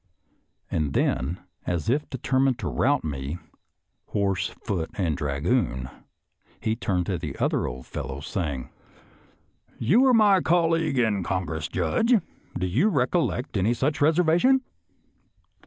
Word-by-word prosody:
And 75 -3 -1
then, 80 +8 0 0.3
as 85 -3 -1
if 145 +5 0
determined 130 -1 +1
to - - -4
rout 140 +1 +1
me 70 +1 -4 0.4
" - - -52
horse, 95 -2 +1 0.2
foot 85 -6 -2
and 85 -6 0
dra 70 -1 -2
goon," 75 - 0 0.7
he 110 - -1
turned 95 -6 -1
to 90 -3 -2
the 75 -5 -6
other - - 0
old 65 +1 -7
fellow, 65 +2 -5
saying, 70 -4 -4 0.6
" - - -35
You 215 - +6
were 260 -2 +5
my 205 -4 +5
colleague 165 -4 +2
in 110 -5 +2
Congress, 85 -4 -2
Judge; 95 - +2 0.4
do 90 - -1
you 120 - +2
recollect 135 - 0
any 105 +5 +2
such 145 +5 -1
reservation.? 175 - +4
105 Hz, 140 wpm, -25 LUFS, -, 0.7 s, You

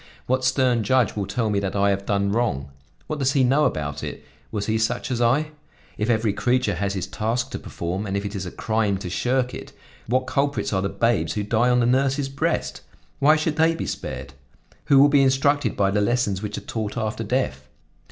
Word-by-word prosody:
What 130 +1 0
stern 130 -2 +2
judge 125 +2 +2
will 100 -2 -2
tell 115 -3 -1
me 100 - +1
that 100 -1 -3
I 100 0 +3
have 100 0 -3
done 100 -1 +1
wrong? 100 - -1 0.3
What 150 - -4
does 135 0 +1
he 135 - +3
know 135 +4 +3
about 75 -1 -2
it? - - -6 0.3
Was 105 -2 -2
he 110 0 0
such 120 +3 -1
as 120 -1 -1
I? 140 +6 +2 0.4
If 105 +3 -2
every 110 -3 +2
creature 125 -3 +1
has 100 +2 -2
his 95 -2 -2
task 115 +4 -2
to - - -4
perform 90 +5 -4
and 100 0 -1
if 100 - -3
it 100 - -4
is 95 -2 -4
a - - -6
crime 110 -3 0
to 95 -2 -6
shirk 125 +5 0
it, - - -8 0.3
what 130 +3 +1
culprits 140 -2 -1
are 95 - +1
the 100 - -1
babes 115 0 +1
who 105 - -2
die 115 +4 +2
on 125 0 +3
the - - +2
nurse's 135 +2 +1
breast! 155 +5 -2 0.4
Why 150 +3 +6
should 155 0 -1
they 165 +1 +3
be - - -4
spared? 65 +1 -5 0.5
Who 140 - +5
will 140 - +8
be 145 -1 +4
instructed 135 -2 +2
by 100 -1 +2
the 105 +1 +1
lessons 105 -3 0
which 105 0 -4
are - - -5
taught 110 0 -4
after 110 0 -2
death? 100 - -2
115 Hz, 220 wpm, -23 LUFS, 100-130 Hz, 0.5 s, will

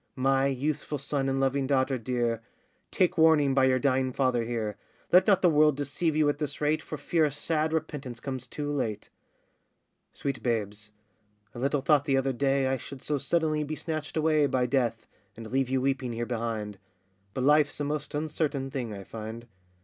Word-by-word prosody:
My 135 +1 +2
youthful 145 +2 -2
son 140 0 -1
and 135 0 0
loving 135 0 +1
daughter 130 -1 +1
dear, 120 -1 -1 0.5
Take 180 -3 +1
warning 155 -4 +5
by 135 0 +4
your 130 -1 +3
dying 130 -1 +1
father 125 -3 +1
here; 110 -3 -3 0.4
Let 185 +1 +6
not 195 -2 +4
the 180 - +6
world 150 -2 +4
deceive 145 +3 -1
you 155 -1 +3
at 145 0 0
this 145 -2 -3
rate, 150 +1 +1
For 155 - -6
fear 160 +1 +1
a 150 - 0
sad 155 +2 -1
repentance 145 -6 -4
comes 130 -1 -5
too 145 +2 -4
late. 110 -7 -3 1.0
Sweet 140 -2 -4
babes, 110 -3 -2 0.6
I 120 - -8
little 140 +2 0
thought 145 +1 +3
the 135 -1 +2
other 135 0 +1
day, 135 +1 +1
I 130 0 +1
should 135 +2 -10
so 150 -2 -1
suddenly 155 0 +1
be 155 +1 -4
snatched 155 -1 -4
away 155 -2 +3
By 130 -2 +1
Death, 120 -3 0 0.3
and 115 -1 -8
leave 135 -1 +1
you 130 0 +1
weeping 130 -2 -1
here 120 +1 -2
behind; 110 -4 -3 0.6
But 130 - -1
life's 150 +1 +3
a - - -1
most 145 0 -3
uncertain 150 -3 -2
thing, 125 -4 -3
I 100 -1 -7
find. 110 +3 -7
135 Hz, 190 wpm, -28 LUFS, 125-150 Hz, 1.0 s, Let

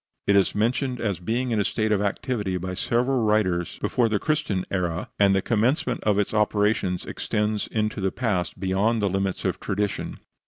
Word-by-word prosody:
It 100 - +3
is 100 -2 +3
mentioned 125 +4 0
as 100 -6 -1
being 120 +7 -1
in 110 - +1
a - - +3
state 110 +2 0
of 105 -2 +2
activity 105 -2 -1
by 90 +1 -4
several 120 +6 +1
writers 100 -6 +1
before 120 -2 +2
the 105 - +1
Christian 150 -10 -1
era, 90 -2 -2
and 100 -1 +5
the 95 - +1
commencement 125 +4 +1
of 105 -2 +3
its 105 0 0
operations 105 -3 +1
extends 105 0 -1
into 110 -2 -1
the 95 0 +1
past 100 -9 -1
beyond 100 +4 +1
the 100 - +2
limits 95 -1 -1
of 90 -1 0
tradition. 100 0 -2
105 Hz, 185 wpm, -25 LUFS, 95-115 Hz, -, and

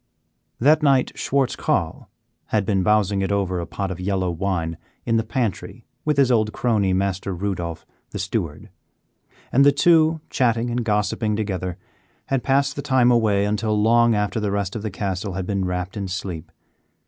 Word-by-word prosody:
That 150 +5 +4
night 135 -3 +3
Schwartz 135 -2 0
Carl - - -2 0.4
had 105 -3 0
been 100 -2 +1
bousing 100 0 +2
it 95 - -1
over 95 -3 0
a 85 - -5
pot 100 -1 -4
of 90 - -6
yellow 95 -1 -1
wine 85 -2 -2 0.3
in 115 -1 +2
the 115 - +1
pantry 110 -2 -3 0.2
with 150 -2 +1
his 135 -2 +4
old 110 -3 +2
crony, 110 -6 +1
Master 95 0 -1
Rudolph, 85 -4 -4 0.2
the - - -6
steward; - - -4 0.8
and 135 - +5
the 145 - +7
two, 160 +2 +4
chatting 120 -1 +1
and 120 0 -1
gossiping 105 0 0
together, 95 -4 -3 0.5
had 135 -2 0
passed 140 +2 +1
the 145 - -3
time 130 -4 +3
away 105 -4 +3
until 105 +1 0
long 115 +1 +4
after 105 +1 -1
the 105 -2 -1
rest 100 0 -2
of 110 - -3
the 110 - -3
castle 95 0 -3
had 95 0 -3
been 100 -1 -1
wrapped 90 +1 -3
in 100 -2 -3
sleep. 90 -3 -5
105 Hz, 175 wpm, -22 LUFS, 95-120 Hz, 0.8 s, the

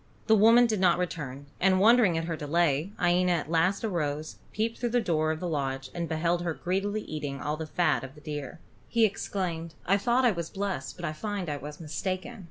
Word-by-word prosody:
The 220 - +5
woman 230 +3 +7
did 220 -4 0
not 180 -2 +4
return, 145 -6 -4
and 185 0 +4
wondering 215 -4 +5
at 165 - -1
her 165 -1 -2
delay, 155 +2 +1
Iena 180 0 +3
at 160 -2 -2
last 180 +6 +2
arose, 155 -7 -2
peeped 225 +2 -2
through 240 - 0
the 245 +1 +2
door 160 -7 +1
of 155 0 -1
the 180 - -3
lodge 135 -4 -2
and 170 -2 -3
beheld 170 +2 0
her 170 -2 -2
greedily 195 +4 -1
eating 145 -3 -5
all 150 +2 -2
the 160 0 -6
fat 155 -7 +1
of 130 +2 -9
the 150 - -14
deer. 150 +1 -6 0.3
He 230 -1 +3
exclaimed: 170 -5 -3
"I 195 +3 +4
thought 240 +5 +2
I 240 - +5
was 170 -4 -4
blessed, 195 -9 -3
but - - -6
I 155 - -2
find 200 +1 -4
I 145 - -2
was 150 +1 -8
mistaken." 185 +8 -4
170 Hz, 215 wpm, -28 LUFS, 155-200 Hz, 0.3 s, woman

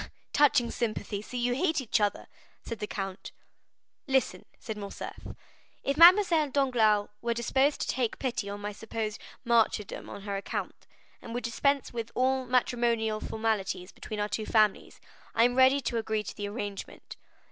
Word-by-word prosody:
"Touching 270 -5 +4
sympathy! 215 -3 -3
So 250 +4 -7
you 245 0 +1
hate 315 +3 +1
each 235 -4 0
other?" 205 -1 0 0.4
said 230 - -6
the 210 - -3
count. 195 -2 -5 0.8
"Listen," 265 -1 +1
said 220 - -6
Morcerf—"if 210 +6 -7
Mademoiselle 340 -2 +7
Danglars 235 -7 +2
were 235 0 -1
disposed 265 +5 +1
to - - -2
take 245 -4 -1
pity 245 -6 -2
on 205 0 -6
my 205 0 -3
supposed 215 0 -5 0.2
martyrdom 230 -3 +1
on 200 - -8
her 200 -1 -3
account, 195 - -5 0.3
and 230 - -7
would 245 - -3
dispense 275 +4 0
with 230 -1 -4
all 260 0 +1
matrimonial 235 -3 +1
formalities 215 -5 -2
between 215 - -7
our 205 - 0
two 215 0 -3
families, 215 -2 +2 0.4
I 230 - +5
am 245 +1 +4
ready 260 +2 +5
to 235 -1 -1
agree 220 -1 -1
to - - -7
the 205 - -4
arrangement. 205 -2 -7
230 Hz, 160 wpm, -29 LUFS, 210-260 Hz, 0.8 s, Mademoiselle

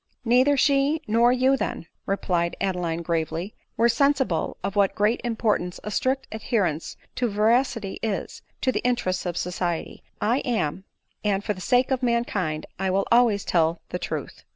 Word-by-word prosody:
" - - -42
Neither 255 +5 +4
she 285 +3 +2
nor 230 +3 +4
you, 260 +2 +3
then," 255 - -3 0.2
replied 175 -3 0
Adeline 175 -3 -1
gravely, 165 +3 -2 0.2
"were 230 - +4
sensible 260 - +1
of 195 +1 -3
what 200 -2 +3
great 210 +4 +1
importance 220 -6 -1
a 210 - -5
strict 260 +5 0
adhe 220 +2 -2
rence 165 -5 -1 0.2
to 245 - 0
veracity 220 0 +1
is, 215 -3 -3 0.2
to 260 - +2
the - - -1
interests 190 -8 0
of 175 -1 -3
society. 175 -2 -3 0.2
I 235 +5 +2
am 220 - -1
y 190 - -13 0.3
— - - -45
and 195 - -4
for 210 - -1
the 185 - -10
sake 250 +6 +2
of 260 -1 +1
mankind 210 -10 0
I 190 0 0
will 195 +1 +1
always 235 -4 +4
tell 165 -1 +2
the - - -3
truth." - - -5
210 Hz, 175 wpm, -25 LUFS, 180-245 Hz, 0.3 s, Neither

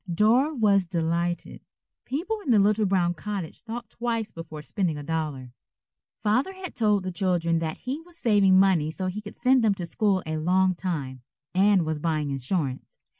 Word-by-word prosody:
Dora 240 - +3
was 200 -6 +3
delighted. 170 0 -2 0.4
People 370 +11 -2
in 285 - -6
the 230 - +6
little 210 +1 +3
brown 180 -2 +2
cottage 190 -1 -6
thought 235 -1 -7
twice 230 -2 -2
before 160 -2 -8
spending 175 -2 -1
a 145 - -6
dollar. 145 -5 -3 0.7
Father 250 - +1
had 375 -2 -8
told 210 -4 +2
the 185 - -3
children 175 -3 +1
that 160 -1 -3
he 270 +5 -5
was 340 0 -16
saving 200 - +4
money 185 -6 +3
so 185 +4 -4
he 185 +3 -3
could 210 -1 -10
send 255 -1 +3
them 210 -3 +3
to 180 - -5
school 195 +1 0
a 155 0 -2
long 185 +4 +2
time, 150 -8 -4 0.3
and 190 -1 +4
was 155 -1 -2
buying 155 -2 -1
insurance. 135 0 -3
190 Hz, 175 wpm, -26 LUFS, 165-215 Hz, 0.7 s, the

